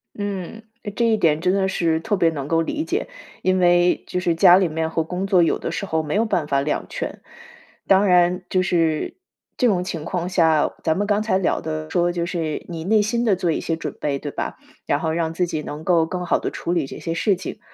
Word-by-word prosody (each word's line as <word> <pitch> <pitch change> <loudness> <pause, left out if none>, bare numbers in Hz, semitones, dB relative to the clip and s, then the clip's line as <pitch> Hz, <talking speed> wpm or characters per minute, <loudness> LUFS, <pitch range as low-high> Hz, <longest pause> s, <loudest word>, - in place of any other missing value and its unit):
嗯， 205 +1 -5 0.2
呃， 205 - -5
这 235 +3 0
一 225 - +3
点 155 -6 +2
真 180 +3 +1
的 195 -1 +1
是 165 -4 +1
特 205 +3 -1
别 170 -2 +3
能 145 -4 -5
够 165 +1 +2
理 300 - -2
解。 375 +7 -2 0.4
因 185 0 +2
为， 175 0 +3
就 180 - -2
是 175 -2 0
家 180 +1 +7
里 190 -2 +2
面 160 0 -2
和 165 0 -1
工 180 +4 -3
作 190 -3 +4
有 165 - +2
的 - - -4
时 200 - -3
候 160 -4 -1
没 150 +5 -3
有 225 - +2
办 170 -8 -1
法 140 -2 +1
两 150 +2 -2
全。 - - -5 0.7
当 195 +1 +5
然， 180 0 +4
就 185 - +2
是， 165 -4 0 0.4
这 250 - +3
种 185 -5 +1
情 165 -4 -5
况 175 0 -2
下， 160 -4 +3
咱 160 +1 +1
们 205 - 0
刚 205 0 +2
才 200 -4 +1
聊 190 - 0
的 155 0 -4
说 175 +1 +1
就 170 -1 -2
是 165 -3 -3
你 165 -2 -5
内 215 +2 +4
心 235 +3 0
的 210 -4 +3
做 180 -2 0
一 - - -1
些 165 - -1
准 165 - -5
备， 145 -2 -1
对 145 0 -5
吧？ - - -4 0.3
然 145 - +1
后 160 - 0
让 165 0 -1
自 180 +2 +1
己 155 -2 -3
能 150 +2 -7
够 170 -2 +3
更 180 +2 -4
好 - - +2
地 - - -3
处 170 - -4
理 160 -6 0
这 - - -9
些 165 - -3
事 195 +4 +2
情。 180 - -7
175 Hz, 265 characters per minute, -22 LUFS, 160-190 Hz, 0.7 s, 家